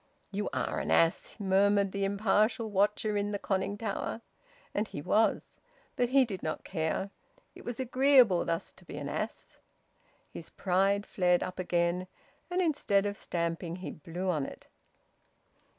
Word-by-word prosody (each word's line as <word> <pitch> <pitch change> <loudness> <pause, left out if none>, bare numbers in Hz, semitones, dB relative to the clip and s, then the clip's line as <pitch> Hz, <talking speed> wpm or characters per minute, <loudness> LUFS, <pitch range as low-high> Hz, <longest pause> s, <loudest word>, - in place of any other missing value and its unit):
"You 205 +1 -2
are - - -1
an - - -3
ass!" 165 0 +2
murmured 200 0 +3
the 200 0 -1
impartial 215 +3 +1
watcher 210 +2 +1
in 205 0 0
the - - 0
conning 195 +1 -1
tower. 225 +1 -3 0.5
And 210 +1 0
he - - -7
was. 215 +9 +1 0.4
But 245 -3 +1
he 265 0 +5
did 195 -6 -6
not 155 - -3
care. 175 +3 -2 0.4
It - - -13
was 240 0 -5
agreeable 255 -6 +5
thus 165 0 -2
to - - -18
be 155 - -9
an 145 -1 -4
ass... 215 +9 -5 0.7
His - - -8
pride 195 +2 +1
flared 180 -2 +2
up 185 0 -6
again, 175 0 0 0.4
and 360 +1 +1
instead 210 - +2
of 205 0 -2
stamping 170 -2 -3
he 185 0 -6
blew 175 +4 -6
on 155 -6 +1
it. - - -8
200 Hz, 155 wpm, -30 LUFS, 180-215 Hz, 0.7 s, he